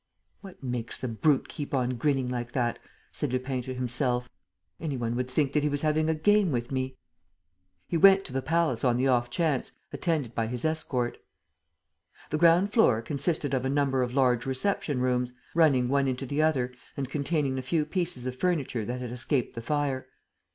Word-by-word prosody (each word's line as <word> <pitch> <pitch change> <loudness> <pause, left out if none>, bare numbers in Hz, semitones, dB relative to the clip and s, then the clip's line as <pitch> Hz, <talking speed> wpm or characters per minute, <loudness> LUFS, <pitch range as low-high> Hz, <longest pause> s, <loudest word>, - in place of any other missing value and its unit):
"What 190 -7 -13
makes 125 -3 -3
the 130 - -4
brute 125 +5 +2
keep 145 -1 -4
on 125 -1 +1
grinning 130 +1 0
like 120 -1 -4
that?" 120 -2 0 0.3
said - - -3
Lupin 130 0 -1
to 130 +1 -6
himself. 125 0 -1 0.5
"Any 150 -5 -3
one 120 -1 -2
would 125 +1 -2
think 140 +1 0
that 150 - +3
he 150 - +1
was 145 0 -2
having 155 0 +1
a 160 - +2
game 205 +3 +3
with 120 -1 -2
me." 130 0 -2 0.9
He 170 - 0
went 195 +3 +7
to 130 - -8
the 135 - 0
palace 165 -6 0
on 125 -2 +3
the 130 +2 +2
off 120 -2 +2
chance, 155 -2 -1 0.2
attended 155 -9 -1
by 115 0 -1
his 125 +3 -4
escort. 135 -6 -1 1.1
The 155 - 0
ground 170 +5 +5
floor 125 - +4
consisted 145 +2 0
of 130 -2 +1
a 130 - 0
number 140 -2 +1
of 125 0 -2
large 125 -3 +3
reception 135 -1 -1
rooms, 125 -1 0 0.2
running 145 -7 +4
one 140 +1 +2
into 130 +1 -2
the 145 +4 0
other 130 -6 +1 0.2
and 135 -2 -2
containing 140 0 -1
the 130 - -2
few 150 +4 0
pieces 170 -6 -3
of 130 0 -3
furniture 140 - -1
that 125 +2 -4
had 125 -2 -5
escaped 125 +1 -1
the 115 - -6
fire. 140 0 -1
130 Hz, 195 wpm, -28 LUFS, 125-155 Hz, 1.1 s, went